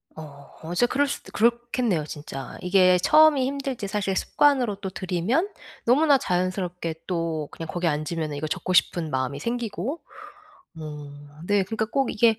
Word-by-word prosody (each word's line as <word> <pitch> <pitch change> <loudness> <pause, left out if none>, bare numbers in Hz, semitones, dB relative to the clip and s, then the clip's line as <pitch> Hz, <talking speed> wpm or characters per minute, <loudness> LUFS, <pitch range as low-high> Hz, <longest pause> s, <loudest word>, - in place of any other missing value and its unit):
어 140 -3 -11 0.2
어 - - -3
진짜 245 +7 +3
그럴 285 +3 +1
수도 - - -6
그렇겠네요 235 -5 +1
진짜. 145 -2 -7
이게 185 0 +5
처음이 305 - +5
힘들지 270 -6 -3
사실 195 -1 -1
습관으로 255 -2 +2
또 195 -1 -6
들이면 190 - -1 0.4
너무나 280 +3 +5
자연스럽게 180 -4 -2
또 165 -4 -2
그냥 165 - -7
거기 175 0 -2
앉으면은 155 0 -2
이거 155 +2 -3
적고 185 +4 -2
싶은 170 -2 +2
마음이 130 +1 -2
생기고 235 - -3 0.8
어 145 0 -10
네. 205 -1 +3
그러니까 220 +3 -2
꼭 270 +2 0
이게 225 +1 +3
185 Hz, 345 characters per minute, -25 LUFS, 160-240 Hz, 0.8 s, 이게